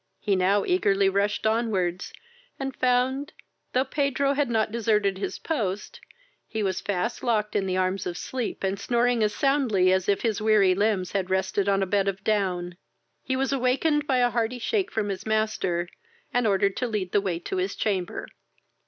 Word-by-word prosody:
He 200 - +1
now 195 +2 +2
eagerly 200 - +3
rushed 200 +2 0
on 225 +2 +2
wards, 180 -3 -1 0.5
and 270 -1 -4
found, 255 +3 +1 0.4
thought 260 +1 0
Pedro 280 -1 +1
had 280 -2 0
not 220 -2 +1
deserted 210 -4 +1
his - - -3
post, 210 - -3 0.5
he 220 -1 -3
was 190 -1 -1
fast 205 +4 -2
locked 215 -3 0
in 195 -2 +1
the 185 0 0
arms 185 0 0
of 175 -1 -4
sleep, 250 -6 -4
and 195 +1 -1
snoring 240 +2 +1
as 210 -1 +2
soundly 240 -10 +3
as 190 +1 0
if 200 - +1
his 220 -3 0
weary 210 -4 +4
limbs 195 -2 0
had 190 -2 -1
rested 190 +1 0
on 195 0 +2
a - - +1
bed 200 +1 +1
of 195 0 -2
down. 180 -5 -1 0.4
He 260 - -2
was 270 +1 0
awakened 275 +4 +1
by 260 - +2
a 245 -1 +3
hearty 230 +2 -1
shake 385 - -1
from 210 -2 -2
his 195 +1 -5
master, 215 -5 0 0.5
and 245 -2 +2
ordered 200 -1 +2
to 250 - -1
lead 205 -5 -3
the 205 - +3
way 185 -4 -2
to 175 +2 -5
his 185 +2 -1
chamber. 190 -4 -2
210 Hz, 190 wpm, -26 LUFS, 190-245 Hz, 0.5 s, weary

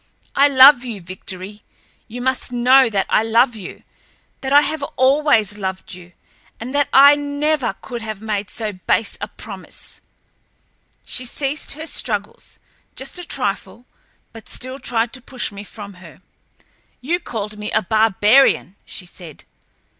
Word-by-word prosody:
"I 280 +1 +6
love 265 -1 +7
you, 230 -5 -5
Victory. 185 +3 -8 0.5
You 245 +2 -7
must 260 -1 0
know 250 +1 +5
that 200 -3 0
I - - +3
love 230 +2 +3
you—that 220 +6 -11
I 290 +1 +7
have 310 0 -2
always 260 -6 +2
loved 190 -1 -5
you, 180 -1 -12 0.5
and 245 +4 -6
that 285 -1 +2
I 280 +2 +8
never 290 -4 -1
could 240 -3 -6
have 215 -2 -6
made 210 -2 -3
so 215 -2 -4
base 190 +3 -1
a - - -3
promise." - - -10 1.0
She 255 - -1
ceased 275 +3 -3
her 310 +3 -7
struggles, 210 -9 -3 0.4
just 270 +7 -6
a - - -6
trifle, 240 - -4 0.5
but 225 -1 -12
still 255 +2 -5
tried 235 -3 -1
to 260 - -6
push 255 -2 -4
me 200 0 -9
from 205 -1 -10
her. 170 +1 -15 0.8
"You 330 +8 -1
called 215 - -6
me 210 0 -4
a - - +1
barbarian!" 215 +1 +3
she 185 - -8
said. 175 -3 -12
235 Hz, 145 wpm, -19 LUFS, 205-270 Hz, 1.0 s, I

